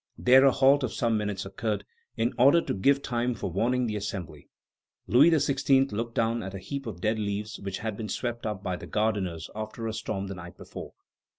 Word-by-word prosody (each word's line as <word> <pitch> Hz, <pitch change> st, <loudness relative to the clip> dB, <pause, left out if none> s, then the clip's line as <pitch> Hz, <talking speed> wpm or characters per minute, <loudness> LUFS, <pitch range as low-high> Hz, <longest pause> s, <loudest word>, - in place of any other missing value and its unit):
There 130 Hz, +2 st, +6 dB
a 135 Hz, -, +7 dB
halt 135 Hz, +2 st, +4 dB
of 125 Hz, -, -1 dB
some 115 Hz, -2 st, +1 dB
minutes 105 Hz, -2 st, -2 dB
occurred, 100 Hz, +1 st, -3 dB, 0.3 s
in 115 Hz, +3 st, +1 dB
order 140 Hz, +7 st, +7 dB
to -, -, -2 dB
give 140 Hz, +8 st, +2 dB
time 120 Hz, 0 st, -1 dB
for 95 Hz, -, -4 dB
warning 125 Hz, +7 st, +1 dB
the 110 Hz, -2 st, -2 dB
Assembly. 90 Hz, -7 st, -6 dB, 0.6 s
Louis 140 Hz, +7 st, +6 dB
XVI. 135 Hz, -3 st, +3 dB
looked 115 Hz, +2 st, -3 dB
down 115 Hz, +1 st, +1 dB
at 95 Hz, 0 st, -6 dB
a -, -, -3 dB
heap 135 Hz, +7 st, -6 dB
of 90 Hz, -6 st, -7 dB
dead 110 Hz, +2 st, +1 dB
leaves 105 Hz, 0 st, -3 dB
which 100 Hz, -1 st, -4 dB
had 110 Hz, -2 st, -4 dB
been 110 Hz, -2 st, -5 dB
swept 120 Hz, -2 st, -3 dB
up 105 Hz, -2 st, -4 dB
by 90 Hz, -1 st, -2 dB
the -, -, -9 dB
gardeners 100 Hz, -7 st, -1 dB
after 110 Hz, +1 st, -5 dB
a 110 Hz, -, -2 dB
storm 110 Hz, -3 st, -3 dB
the 100 Hz, -, -5 dB
night 90 Hz, 0 st, -10 dB
before. -, -, -9 dB
110 Hz, 210 wpm, -28 LUFS, 100-125 Hz, 0.6 s, a